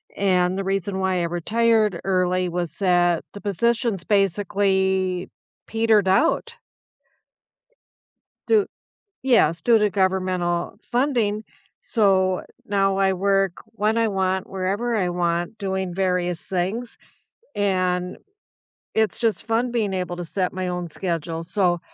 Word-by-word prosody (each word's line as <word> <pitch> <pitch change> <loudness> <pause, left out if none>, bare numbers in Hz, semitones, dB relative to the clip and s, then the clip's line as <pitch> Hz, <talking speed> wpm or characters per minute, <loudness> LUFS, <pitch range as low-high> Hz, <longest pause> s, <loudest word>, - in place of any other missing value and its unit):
and 185 -2 +2
the - - -1
reason 195 0 -2
why 190 -1 +1
I - - 0
retired 215 +3 +1
early 185 -1 +1
was 175 -2 -4
that 175 -3 +2
the 205 - -9
positions 220 0 0
basically 190 -1 +1 0.3
petered 225 -3 +2
out. 300 - +2 1.9
Due 430 -3 +4 0.6
Yes, 170 - +3
due 230 +3 +5
to 210 -1 +2
governmental 185 -3 0
uh, - - -26
funding. 240 -5 0 0.4
So, 190 -4 +2 0.2
now 195 -1 +1
I 195 0 +3
work 195 -1 +1
when 220 0 -1
I 230 - +3
want, 190 -1 -1
wherever 200 +6 -1
I 185 -4 +1
want, 175 +3 -1
doing 190 -2 -2
various 180 -2 0
things, 195 +7 -3 0.6
and 185 -2 0 0.8
it's 220 -1 +1
just 225 -3 0
fun 230 +2 0
being 220 -5 0
able 180 -1 -3
to 175 - -5
set 180 +2 -1
my 185 0 -3
own 180 -1 -3
schedule 165 -1 -3
so, 180 -1 +1
190 Hz, 125 wpm, -23 LUFS, 180-210 Hz, 1.9 s, due